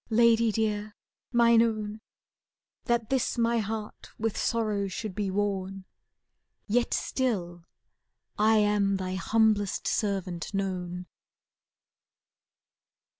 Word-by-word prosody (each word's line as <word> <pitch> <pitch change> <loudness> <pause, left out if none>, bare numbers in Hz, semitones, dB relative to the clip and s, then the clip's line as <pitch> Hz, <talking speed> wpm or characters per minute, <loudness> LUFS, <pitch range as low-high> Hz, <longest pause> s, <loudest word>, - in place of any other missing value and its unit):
Lady 230 0 +4
dear, 210 -1 -1 0.4
mine 235 -1 +5
own, 215 -2 -1 0.8
That 235 -1 0
this 260 -1 0
my 235 0 +2
heart 215 0 -5
with 225 -1 -1
sorrow 215 -3 0
should 200 +1 -5
be 205 0 -2
worn. 195 -1 -2 0.8
Yet 235 +3 +1
still 175 -10 -2 0.7
am 210 -2 +3
I - - +2
thy 185 -1 -3
humblest 205 +2 +1
servant 195 -3 -2
known. 180 -2 -3
210 Hz, 95 wpm, -28 LUFS, 195-225 Hz, 0.8 s, mine